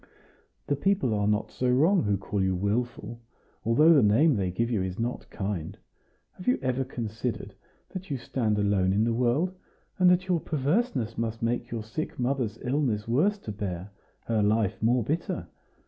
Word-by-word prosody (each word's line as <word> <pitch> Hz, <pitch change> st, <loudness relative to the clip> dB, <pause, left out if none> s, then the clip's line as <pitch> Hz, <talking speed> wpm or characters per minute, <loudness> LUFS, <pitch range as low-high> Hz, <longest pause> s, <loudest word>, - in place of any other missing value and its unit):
"The 145 Hz, -, 0 dB
people 140 Hz, -, +1 dB
are 105 Hz, -1 st, +1 dB
not 105 Hz, 0 st, 0 dB
so 125 Hz, -, -1 dB
wrong 160 Hz, +10 st, +4 dB
who 100 Hz, -2 st, +1 dB
call 100 Hz, +1 st, -2 dB
you 95 Hz, -1 st, +1 dB
wilful, 115 Hz, +3 st, -2 dB, 0.4 s
although 150 Hz, +9 st, +5 dB
the 145 Hz, -, +6 dB
name 125 Hz, +8 st, +4 dB
they 95 Hz, -3 st, 0 dB
give 115 Hz, +7 st, -1 dB
you 110 Hz, -5 st, +1 dB
is 95 Hz, -1 st, -3 dB
not 120 Hz, +2 st, -3 dB
kind. 95 Hz, -5 st, -4 dB, 0.5 s
Have 180 Hz, -, -12 dB
you 250 Hz, -, +4 dB
ever 130 Hz, 0 st, 0 dB
considered 115 Hz, -2 st, -4 dB, 0.4 s
that 185 Hz, -1 st, -7 dB
you 140 Hz, -, -1 dB
stand 115 Hz, -4 st, -1 dB
alone 100 Hz, -2 st, +2 dB
in 105 Hz, +2 st, +2 dB
the 115 Hz, 0 st, +1 dB
world, 125 Hz, +10 st, +1 dB, 0.5 s
and 180 Hz, -1 st, +6 dB
that 180 Hz, +1 st, +3 dB
your 180 Hz, -2 st, +2 dB
perverseness 145 Hz, -, -1 dB
must 115 Hz, 0 st, -3 dB
make 120 Hz, +1 st, -1 dB
your 115 Hz, -2 st, -4 dB
sick 155 Hz, +9 st, -5 dB
mother's 125 Hz, -4 st, -1 dB
illness 125 Hz, -5 st, 0 dB
worse 165 Hz, -, +2 dB
to 110 Hz, -, -7 dB
bear, 100 Hz, -2 st, -5 dB, 0.3 s
her 115 Hz, -2 st, +1 dB
life 105 Hz, -1 st, +1 dB
more 120 Hz, +2 st, +3 dB
bitter? 155 Hz, +9 st, -2 dB
115 Hz, 180 wpm, -27 LUFS, 105-140 Hz, 0.5 s, the